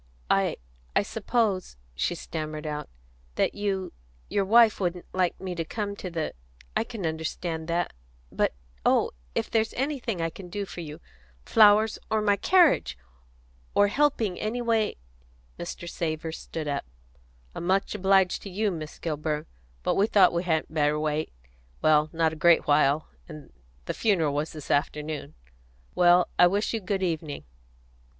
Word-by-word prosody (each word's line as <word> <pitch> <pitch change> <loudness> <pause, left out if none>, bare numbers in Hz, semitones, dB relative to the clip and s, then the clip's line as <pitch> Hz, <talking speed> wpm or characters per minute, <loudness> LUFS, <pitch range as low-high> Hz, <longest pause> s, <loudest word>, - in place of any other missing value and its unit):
"I - - +2 0.4
I - - +4
suppose," 210 - -1 0.2
she 120 - -1
stammered 155 -2 -5
out, 150 -1 -4 0.5
"that - - +1
you 195 -2 -2 0.4
your 200 - +1
wife, 225 +1 +6
wouldn't 180 -2 -2
like 185 -2 0
me 185 -1 -4
to 170 -1 -2
come 205 +4 -4
to 185 - -5
the 165 -2 -3 0.4
I 220 - +2
can 225 -5 -6
understand 160 +1 -3
that; 170 +1 -1 0.4
but - - 0 0.3
oh! - - +3 0.2
if - - -1
there 225 - +4
is 220 - -5
anything 255 - -2
I 165 0 -1
can 180 +1 -10
do 200 +3 -3
for 180 - -8
you 150 -2 -8 0.4
flowers 215 0 +5
or 220 - +2
my 205 -1 +4
carriage 310 - +4 0.8
or 205 0 +5
helping 230 -7 +1
anyway 225 -1 0 0.3
" - - -32
Mr. 175 0 -6
Savor 160 -1 -3
stood 160 -1 -6
up. 140 - -2 0.7
"I'm 170 - -5
much 195 +1 +1
obliged 190 -2 +3
to 200 - -7
you, 205 +2 0
Miss 155 -3 -6
Kilburn; 150 -1 -2 0.4
but - - +2
we 200 - +3
thought 195 -5 +5
we 170 - +1
hadn't 160 -3 -1
better 150 -1 +2
wait, 155 0 -1 0.5
well 155 0 +4
not 160 -1 +1
a 155 - -10
great 170 -1 +5
while, 145 0 +3 0.2
and 150 - -11 0.3
the - - -2
funeral 170 -10 +1
was 150 +2 -2
this 155 -3 -7
afternoon. 150 - -1 0.6
Well, 175 0 +5
I 175 - +9
wish 200 +5 0
you 225 - 0
good 190 0 -1
evening." 160 - -2
175 Hz, 160 wpm, -27 LUFS, 155-205 Hz, 0.8 s, I